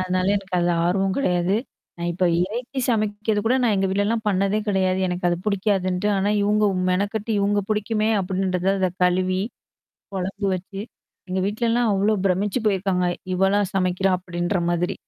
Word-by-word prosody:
அதனால 185 +1 +1
எனக்கு 195 -1 -5
அதுல 175 0 +2
ஆர்வம் 190 +2 +1
கிடையாது. 180 -5 +1 0.4
நான் 175 0 -2
இப்ப 180 +2 0 0.2
இறைச்சி 240 +7 -5
சமைக்கிறது 215 -2 0
கூட 235 +3 +3
நான் 230 -4 +3
எங்க 195 0 +1
வீட்லலாம் 205 +4 0
பண்ணதே 195 +1 +1
கிடையாது. 190 -2 +1
எனக்கு 180 0 -2
அது 175 - +1
புடிக்காதுன்ட்டு. 200 -2 0
ஆனா, 195 +1 +1
இவுங்க 210 +1 +2 0.3
மெனக்கட்டு 205 +4 -1
இவங்க 205 +1 +2
புடிக்குமே 215 0 0
அப்டின்றது 185 -1 -1
அத 185 -1 +1
கழுவி, 185 +1 +1 0.7
குழம்பு 195 +2 -3
வச்சு 190 +2 -6 0.5
எங்க 185 +1 -1
வீட்லல்லாம் 230 +2 +1
அவ்ளோ 200 +2 +2
பிரமிச்சு 195 +5 +1
போயிருக்காங்க 190 -3 +1 0.3
"இவளா 195 +2 +2 0.2
சமைக்கிறா" 185 0 +1
அப்டின்ற 175 +1 -2
மாதிரி. 175 +1 0
195 Hz, 145 wpm, -23 LUFS, 185-210 Hz, 0.7 s, கூட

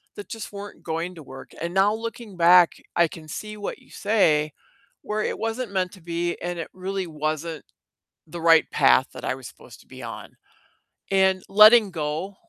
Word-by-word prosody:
that 410 - -9
just 225 -3 -7
weren't 200 0 -9
going 165 +3 -3
to 160 - -11
work, 135 -1 -12
and 170 +1 -3
now 195 +2 +3
looking 225 -3 -7
back, 175 0 +6 0.2
I 170 -1 +4
can 160 -2 -11
see 215 +7 -7
what 205 - -5
you - - -23
say, 155 -8 +1 0.5
where 215 0 -3
it - - -2
wasn't 225 -1 -3
meant 185 -1 0
to 190 - -14
be 170 +1 -2
and 175 0 -4
it 165 - -5
really 190 0 -4
wasn't 155 +1 -4 0.6
the 170 +1 -7
right 165 -1 +5
path 65 - +4
that - - -10
I - - 0
was - - -9
supposed - - -15
to - - -21
be - - -12
on, - - -8 0.8
and 190 -1 +3
letting 215 +1 +7
go 160 +4 -3
180 Hz, 185 wpm, -24 LUFS, 165-205 Hz, 0.8 s, letting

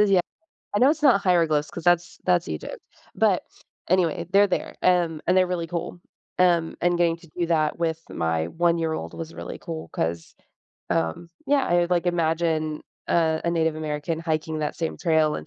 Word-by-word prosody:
Uh, - - +7
yeah. 195 -3 +4 0.6
I - - +2
know 260 +3 +6
it's 310 0 0
not 245 -9 +5
hieroglyphs 165 -5 +2
cause 170 - -8
that's 175 -1 +2
that's 180 -2 +2
Egypt, 80 -1 -5 0.4
but - - +2 0.5
anyway, 170 -2 +1
they're 200 +1 +7
there, 185 - -3
and 170 -4 +2
and 185 - +3
they're 185 -1 +4
really 170 -2 -2
cool, 175 +1 -5 0.4
um, 170 -3 +3
and 175 0 +2
getting 170 -1 +2
to 170 -2 -18
do 175 - +1
that 160 -1 +1
with 160 -1 0
my 80 0 -1
one-year-old 165 - 0
was 165 0 -7
really - - -7
cool 160 -1 -7
'cause, 85 0 -3 0.5
um, 80 - -1 0.2
yeah, 280 -2 +2
I - - +1
would, 175 0 -1
like, 180 0 +1
imagine 160 -2 0 0.3
a 160 -2 +1
a 170 - +1
Native 160 -2 +1
American 155 +1 -3
hiking 160 -1 -2
that 150 - -2
same 165 -1 -3
trail 160 -3 +2
and 75 - -6
165 Hz, 185 wpm, -24 LUFS, 155-175 Hz, 0.6 s, Uh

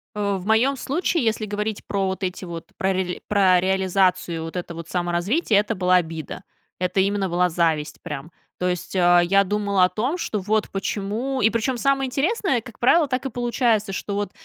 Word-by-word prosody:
О, 200 -1 0
в 185 - -8
моем 245 +6 +3
случае, 320 +3 -1
если 220 -1 0
говорить 210 +1 -3
про 195 -1 -1
вот 190 +1 -4
эти 185 +1 -3
вот, 170 -1 -7
про 190 0 +1
рели 185 -1 -2
про 190 -3 +4
реализацию 185 -3 +1
вот 165 +2 -7
это 175 -1 -4
вот 165 0 -8
саморазвития, 185 - +1
это 210 +1 -1
была 185 0 +3
обида. 160 -3 -4 0.4
Это 185 +1 0
именно 195 -1 +1
была 180 +1 +2
зависть 160 -3 0
прям. 150 +3 -7 0.3
То 180 - -1
есть, 180 +1 -3
а, 175 -1 +5
я 195 +3 +4
думала 200 -1 +1
о 180 - +5
том, 260 +11 -1
что 215 - -2
вот 210 +2 0
почему 215 +7 -2
и 220 - +5
причем 230 +2 -1
самое 270 +1 +1
интересное, 275 - 0
как 235 -1 -13
правило, 300 +5 +4
так 260 0 -2
и - - -1
получается, 235 -4 0
что 200 +1 -4
вот, 205 -2 -2
200 Hz, 195 wpm, -23 LUFS, 180-230 Hz, 0.4 s, а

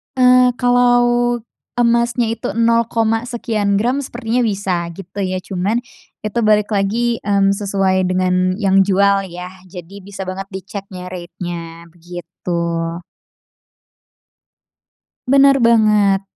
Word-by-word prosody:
Eee, 250 -1 +5
kalau, 245 0 +3 0.7
emasnya 235 -1 +1
itu 230 - -4
nol 230 0 +2
koma 225 +1 0
sekian 215 -4 -1
gram 245 +7 +1
sepertinya 245 -3 -3
bisa 190 -4 -2
gitu 195 +1 -9
ya 185 -1 -2
cuman 200 +6 -2 0.4
itu 215 +2 -2
balik 215 -1 +2
lagi, 225 +4 0
mmm, 200 -1 +2
sesuai 195 -2 0
dengan 185 0 +1
yang 195 -1 +2
jual 195 0 +2
ya 180 +1 -8 0.2
jadi 180 +2 -10
bisa 195 0 -8
banget 190 +1 -6
diceknya 190 -1 -8
rate-nya 175 -2 -7
begitu. 175 +1 -12 2.8
Bener 275 0 +6
banget. 210 -4 +3
200 Hz, 110 wpm, -18 LUFS, 185-230 Hz, 2.8 s, Bener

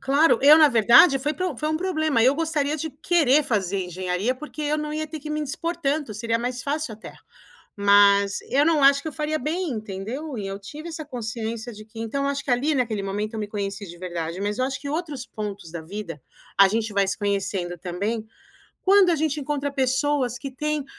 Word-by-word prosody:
claro. 285 +4 +3
Eu 295 +3 +8
na 310 -2 +7
verdade 240 - +6
foi 295 +3 -2
pro 345 -3 -3
foi 305 - -2
um 310 - 0
problema, 315 -8 +1
eu 260 +3 +5
gostaria 310 -2 -1
de 320 +1 -4
querer 300 -1 +3
fazer 195 -6 -1
Engenharia, 180 +6 -2
porque 305 +2 -7
eu 300 +1 0
não 300 0 -4
ia 310 0 -2
ter 315 +1 -7
que 300 +1 -9
me 305 0 -2
indispor 330 +4 -3
tanto, 285 -6 -1
seria 230 +2 -1
mais 245 +1 -3
fácil, 290 -4 -2
até. 215 - -11 0.6
Mas 200 0 +5
eu 280 +2 +4
não 315 -4 +3
acho 280 0 +6
que - - -4
eu - - -7
faria 300 +2 -2
bem, 330 +2 -2
entendeu? 220 +6 -5
E 200 - -4
eu 195 0 -5
tive 300 +11 -9
essa 320 -1 -6
consciência 230 -3 -5
de 215 0 -11
que 220 +1 -14
então, 230 +5 -2
eu - - +1
acho 280 0 -4
que - - -3
ali 275 +6 +1
naquele 225 -6 -1
momento 205 +3 -3
eu 220 - -3
me 210 - -4
conheci 200 -1 -4
de 175 - -11
verdade. 175 -1 -4
Mas 205 +2 -2
eu 255 - +2
acho 275 +1 -4
que 280 - -6
outros 300 -5 -4
pontos 200 -6 -7
da 170 - -6
vida, 165 -5 -7 0.4
a 195 - +8
gente 220 +1 -1
vai 200 -1 +2
se - - -2
conhecendo 195 -3 -2
também, 200 +7 -3 0.6
quando 390 -1 +5
a - - +3
gente 310 -1 -1
encontra 285 0 -2
pessoas 265 -1 0
que 270 +3 -7
têm 300 +2 -2
255 Hz, 220 wpm, -24 LUFS, 205-300 Hz, 0.6 s, Eu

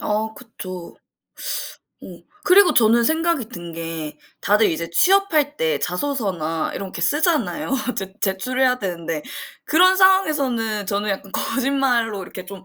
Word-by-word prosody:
어 215 +1 -1
그쵸. 185 -7 -9 1.0
어. - - -11 0.4
그리고 385 -1 +6
저는 235 +1 +4
생각이 320 -4 0
든 175 -8 -9
게 165 -2 -6 0.2
다들 210 +2 +3
이제 165 +1 -4
취업할 315 - +3
때 155 -2 0
자소서나 180 - -2
이렇게 190 -3 -6
쓰잖아요. 285 - 0 0.3
제 190 -1 -4
제출해야 250 +6 +1
되는데 170 -5 -4 0.4
그런 370 +4 +5
상황에서는 280 - +2
저는 205 +2 -1
약간 195 0 -4
거짓말로 250 -6 0
이렇게 185 +1 -9
좀 190 0 -10
220 Hz, 285 characters per minute, -21 LUFS, 180-285 Hz, 1.0 s, 그리고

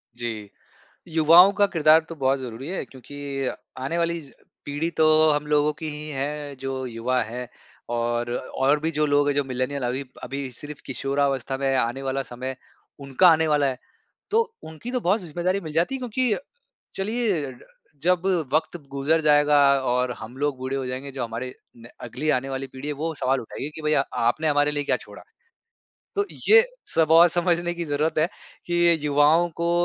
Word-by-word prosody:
जी। 115 -4 -5 0.6
युवाओं 165 +4 +7
का 205 - +5
किरदार 160 -4 +5
तो 165 - -6
बहुत 135 -2 +1
ज़रूरी 125 0 -7
है 185 - -3
क्योंकि 140 +1 -6 0.3
आने 135 +6 -2
वाली 170 0 0
ज 140 -3 -15 0.3
पीढ़ी 145 +3 -2
तो 160 - +4 0.3
हम 150 0 0
लोगों 150 0 +2
की 155 +1 -6
ही 150 +1 -6
हैं, 145 0 -4
जो 135 0 -4
युवा 125 +2 -1
है 120 +3 -6 0.4
और 120 0 -1
और 140 +3 0
भी 160 +2 -1
जो 150 0 +1
लोग 145 0 +3
है, - - +3
जो 145 0 +1
मिलेनियल 130 +2 -3
अभी 125 +3 -2 0.2
अभी 135 +1 -5
सिर्फ़ 145 +4 -9
किशोरावस्था 135 0 -1
में 135 -1 +1
आने 130 +2 -1
वाला 135 0 -1
समय, 130 +1 -6 0.4
उनका 140 +6 +4
आने 160 -1 +5
वाला 145 -2 +3
है। 130 -2 -2 0.5
तो 445 +2 +4 0.2
उनकी 160 +10 -8
तो 250 - 0
बहुत 200 0 +2
ज़िम्मेदारी 175 +3 -1
मिल 155 -4 -7
जाती 170 - +1
है - - -5
क्योंकि 250 -2 0 0.6
चलिए, 195 - -1 0.5
जब 180 +1 +2 0.3
वक़्त 160 +3 +1
गुज़र 140 +4 +1
जाएगा 150 -1 +4 0.2
और 125 -1 0
हम 120 +4 -9
लोग 145 -1 -1
बूढ़े 130 +1 -3
हो 135 - -3
जाएँगे, 130 +2 -5
जो 130 -2 -4
हमारे 120 +2 -5 0.2
न 115 0 -13 0.2
अगली 125 +6 -3
आने 135 -1 +1
वाली 135 0 -4
पीढ़ी 130 +2 -8
है, 150 - -1
वो 160 +3 -3
सवाल 135 -1 +1
उठाएगी 135 +5 -6
कि, 160 - -7
"भैया, 155 -2 +2
आपने 125 +6 +1
हमारे 145 0 +2
लिए 145 -1 -2
क्या - - +1
छोड़ा? - - -13 0.9
तो 405 - +2 0.2
ये 455 +2 +8 0.3
सब 160 -1 +3
और 170 +2 +8
समझने 175 0 0
की 170 0 -4
ज़रूरत 150 +1 0
है 155 +2 +3 0.4
कि 175 - -2
ये 175 0 +5
युवाओं 150 +4 +4
को 170 0 +1
145 Hz, 185 wpm, -24 LUFS, 130-160 Hz, 0.9 s, ये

